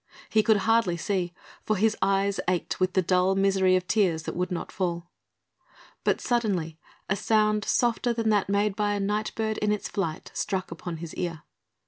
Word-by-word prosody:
He 220 - +5
could 220 -1 +4
hardly 225 -6 +3
see, 180 -1 -1 0.3
for 215 - 0
his 220 +3 +2
eyes 195 +1 +1
ached 180 -2 -1
with 185 0 +1
the 185 - +2
dull 185 +2 +2
misery 190 -1 +3
of 180 0 -1
tears 180 -7 +2
that - - -5
would 180 +2 -2
not 175 - -4
fall; 175 -2 -3 0.9
but - - +2
suddenly 190 -10 -1 0.3
a 195 - +1
sound 215 0 +2
softer 240 0 +1
than 230 -1 0
that 205 -2 +2
made 200 0 +1
by 205 0 0
a 205 - -1
night 210 +2 -1
bird 220 -1 -1
in 210 0 +1
its 210 - -1
flight 165 -6 -3
struck 190 -3 -2
upon 165 0 -6
his 165 0 -7
ear. 165 -3 -4
195 Hz, 185 wpm, -27 LUFS, 180-215 Hz, 0.9 s, He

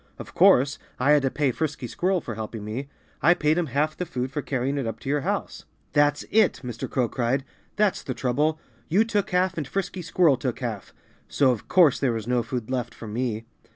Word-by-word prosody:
Of - - -10
course, 140 +4 +5 0.2
I 135 +4 +3
had 150 -1 +6
to 135 - +1
pay 140 -1 +1
Frisky 150 -1 -3
Squirrel 180 +9 0
for 120 - -6
helping 110 0 -6
me. 125 +6 -5 0.3
I 175 +3 +5
paid 155 -2 +2
him 170 - -1
half 150 +4 0
the 180 - -4
food 130 -2 -3
for 145 0 -2
carrying 135 +1 -1
it 130 - -2
up 115 - -4
to - - -5
your 145 0 +1
house." - - -3 0.3
"That's 145 0 +3
it!" 215 -2 +3
Mr. 120 -2 -5
Crow 125 -3 +1
cried. 130 +4 -1 0.3
"That's 210 -2 +2
the 130 - -5
trouble! 150 +6 0 0.3
You 190 +7 +4
took 210 -3 0
half 180 -1 +1
and 145 - -4
Frisky 190 +2 -3
Squirrel 165 -4 +3
took 125 -1 -3
half. 115 -6 -5 0.4
So 135 -2 +3
of 120 - -4
course 170 -7 +5
there 130 -4 +1
was 110 -2 -4
no 125 0 +1
food 120 +1 -5
left 120 -2 -2
for - - -9
me. 115 0 -2
135 Hz, 220 wpm, -25 LUFS, 125-155 Hz, 0.4 s, had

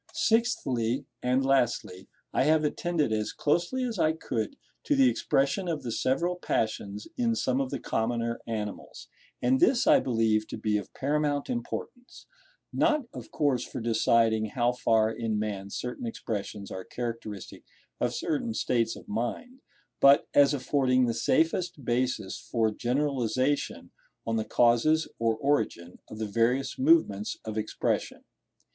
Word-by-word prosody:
Sixthly, 135 - +1 0.2
and 130 +2 +1
lastly, 120 -8 0 0.3
I - - +2
have 155 +1 +3
attended 155 -3 0
as 110 -1 -1
closely 175 - 0
as 235 -6 -3
I 155 -1 +3
could, 115 -8 -3 0.3
to 295 - +2
the 270 -1 +5
expression 180 - +1
of 160 -3 -2
the 120 - -4
several 170 +10 0
passions 105 - -2
in 235 -2 +1
some 130 - 0
of 135 - -2
the 140 - -3
commoner 115 +1 -1
animals; 105 -3 -6 0.3
and 130 +2 +3
this 245 -1 +4
I 295 -2 +6
believe 115 - +1
to - - -6
be 105 -1 0
of 100 - -6
paramount 145 - 0
importance, 245 0 -6 0.5
not 300 -4 +2
of - - -9
course 140 -5 +1
for - - -6
deciding 115 -1 +2
how 120 +3 +1
far 110 -3 +2
in 115 -2 -2
man 100 -2 -3
certain 125 - -5
expressions 105 - -5
are 95 - -5
characteristic 115 -5 -6 0.4
of - - +1
certain 140 -8 -2
states 115 -1 0
of - - -13
mind, 120 - -4 0.4
but 140 +1 +6
as 145 0 +5
affording 130 -2 +2
the 115 - 0
safest 160 +4 0
basis 120 -5 -1
for 110 -2 0
generalisation 130 +2 -1 0.3
on 115 - -1
the 110 - -1
causes, 120 +8 +3
or 115 -1 +2
origin, 110 -11 -1
of 110 - -9
the 110 - -2
various 115 - 0
movements 265 - +3
of 110 -1 -5
Expression. 110 0 -2
125 Hz, 145 wpm, -28 LUFS, 110-150 Hz, 0.5 s, I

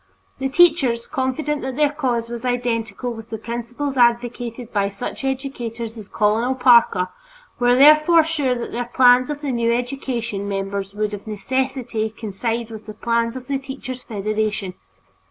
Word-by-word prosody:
The 270 0 -1
teachers, 275 -8 +4
confident 280 +3 -2
that 260 0 -4
their 295 0 +3
cause 250 -6 -1
was 235 0 -6
identical 240 -1 -2
with 225 0 -10
the 220 - -4
principles 240 +5 -4
advocated 240 0 +1
by 200 -2 +1
such 200 +7 -6
educators 240 -4 -4
as 215 -3 -10
Colonel 225 +5 +1
Parker, 235 -8 +5 0.5
were 245 0 +4
therefore 305 +4 +7
sure 295 -5 0
that 240 - -5
the 240 0 -4
plans 250 0 +6
of 295 -1 -4
the 285 -3 -2
"new 235 -1 +1
education" 235 -4 -2
members 195 0 -3
would 210 0 -1
of 205 +1 -7
necessity 240 0 -2
coincide 225 +2 -3
with 220 -1 -9
the 215 - -8
plans 230 +1 0
of 255 -1 -7
the 275 +1 -1
Teachers' 265 -2 -7
Federation. 215 -3 -2
240 Hz, 155 wpm, -21 LUFS, 220-265 Hz, 0.5 s, therefore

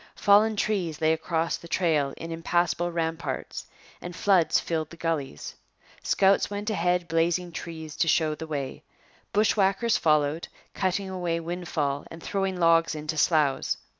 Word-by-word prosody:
Fallen 210 +2 +4
trees 190 -7 -1
lay 160 0 +3
across 165 +1 -1
the 170 - -12
trail 155 -6 +1
in 165 - -7
impassable 175 +1 0
ramparts 165 0 -3 0.3
and 175 -1 -7
floods 185 -2 +3
filled 160 -2 -3
the 170 - -12
gullies. 155 - -3 0.5
Scouts 195 0 +3
went 205 +1 -3
ahead 180 -3 0
blazing 170 +2 0
trees 160 -2 -7
to 165 - +1
show 155 -1 +2
the 160 +1 -7
way. 140 -4 -4 0.5
Bushwhackers 210 +1 +2
followed, 155 0 +1 0.3
cutting 190 +1 -1
away 175 -3 -2
windfall 165 -5 -3
and 165 0 -11
throwing 195 -2 -2
logs 165 -1 +4
into 155 +1 -4
sloughs. 150 -3 +2
165 Hz, 140 wpm, -26 LUFS, 160-185 Hz, 0.5 s, Fallen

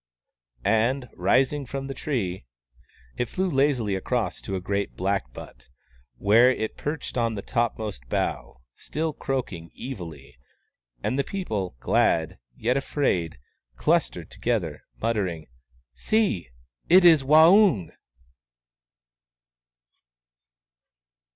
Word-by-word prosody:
" - - -71 0.2
and, 115 +5 +2
rising 130 +10 +2
from 135 +1 -5
the 135 - -5
tree, 110 - -3 0.7
it 120 - -1
flew 190 +1 -1
lazily 135 - +1
across 100 +1 -2
to 95 - -4
a - - -1
great 100 +2 -2
blackbutt, 65 -10 -4 0.5
where 115 +5 +5
it 110 -4 -2
perched 150 -3 -4
on 115 -1 0
the 100 - -5
topmost 110 - -2
bough, 65 - -2
still 160 0 -3
croak 135 -6 -3
ing 85 -1 -9
evilly. 85 - -8 0.6
And 130 - 0
the - - +3
people, 110 - -4
glad, 80 +2 +1 0.2
yet 125 +4 0
afraid, 95 - -1 0.4
clus - - +2
tered - - -10
together, 95 -11 -2 0.2
muttering, 95 -9 -1 0.3
" 65 -1 -37
See! 205 - +1 0.4
It 180 +1 +7
is 160 -4 +7
Waung 160 - +5
115 Hz, 110 wpm, -25 LUFS, 90-135 Hz, 0.7 s, It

